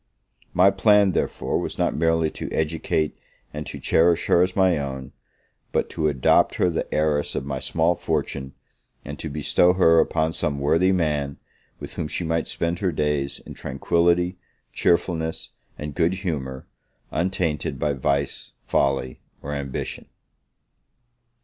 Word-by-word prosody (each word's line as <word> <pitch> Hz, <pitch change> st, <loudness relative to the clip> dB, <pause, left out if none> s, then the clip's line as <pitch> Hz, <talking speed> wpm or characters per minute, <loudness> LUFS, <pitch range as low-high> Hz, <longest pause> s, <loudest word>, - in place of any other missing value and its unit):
My 95 Hz, +2 st, +5 dB
plan, 100 Hz, 0 st, +4 dB
therefore, -, -, -1 dB
was -, -, -4 dB
not -, -, +1 dB
merely 80 Hz, -1 st, +2 dB
to -, -, -6 dB
educate 80 Hz, -1 st, -1 dB, 0.4 s
and 75 Hz, 0 st, -5 dB
to -, -, -6 dB
cherish 85 Hz, +1 st, +3 dB
her 85 Hz, -, +4 dB
as 90 Hz, 0 st, +1 dB
my 95 Hz, -5 st, +3 dB
own, 65 Hz, -2 st, -5 dB, 0.6 s
but -, -, 0 dB
to 80 Hz, -, 0 dB
adopt 65 Hz, -4 st, +3 dB
her 90 Hz, -, +2 dB
the 80 Hz, -, -3 dB
heiress 75 Hz, -1 st, 0 dB
of 65 Hz, -, -2 dB
my 70 Hz, -1 st, -3 dB
small 80 Hz, +4 st, +1 dB
fortune, 75 Hz, -5 st, -3 dB, 0.5 s
and 70 Hz, 0 st, -7 dB
to 80 Hz, -, -4 dB
bestow 75 Hz, +4 st, +3 dB
her 85 Hz, -3 st, +5 dB
upon 80 Hz, 0 st, +1 dB
some 70 Hz, -3 st, -1 dB
worthy 80 Hz, +6 st, +3 dB
man, 75 Hz, -6 st, 0 dB, 0.4 s
with -, -, -8 dB
whom -, -, -2 dB
she 90 Hz, -, -3 dB
might 80 Hz, 0 st, -1 dB
spend 85 Hz, +1 st, -2 dB
her 95 Hz, -3 st, 0 dB
days 75 Hz, -2 st, -1 dB
in -, -, -8 dB
tranquility, 85 Hz, +5 st, +1 dB, 0.3 s
cheerfulness, 85 Hz, -2 st, 0 dB, 0.3 s
and 75 Hz, -1 st, -5 dB
good 85 Hz, +3 st, +1 dB
humour, 70 Hz, -9 st, -4 dB, 0.5 s
untainted 85 Hz, -2 st, -1 dB
by 75 Hz, -, 0 dB
vice, 70 Hz, +1 st, -1 dB
folly, 70 Hz, -2 st, 0 dB, 0.2 s
or 75 Hz, -, -4 dB
ambition. 70 Hz, -2 st, -5 dB
80 Hz, 145 wpm, -24 LUFS, 70-85 Hz, 0.6 s, My